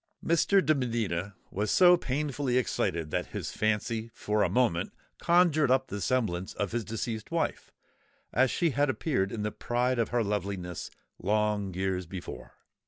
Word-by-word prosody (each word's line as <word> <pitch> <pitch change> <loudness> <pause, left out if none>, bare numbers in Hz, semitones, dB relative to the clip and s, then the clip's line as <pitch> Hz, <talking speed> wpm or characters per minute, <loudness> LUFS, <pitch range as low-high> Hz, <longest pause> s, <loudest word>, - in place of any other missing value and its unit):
Mr. 185 +4 +3
de 155 - +5
Medina 110 - -2 0.2
was 105 +2 -1
so 180 -1 +7
painfully 140 -4 -1
excited 85 -8 -1
that - - -1
his - - -5
fancy 110 +1 -1
for 105 0 0
a - - +3
moment 120 -9 +1 0.3
conjured 170 -5 +4
up 130 +1 +2
the 100 - -4
semblance 95 -9 0
of 100 -2 -2
his 120 0 -1
deceased 110 0 -4
wife, 165 -1 -2 0.6
as 130 +2 +4
she 170 +4 +1
had 145 +1 +1
appeared 125 -8 0
in 105 - -3
the 105 - -1
pride 125 +2 0
of 115 - +1
her 120 -1 +1
loveliness, 100 -4 -3 0.3
long 105 0 0
years 95 -1 -1
before. 90 0 -8
115 Hz, 160 wpm, -29 LUFS, 100-130 Hz, 0.6 s, so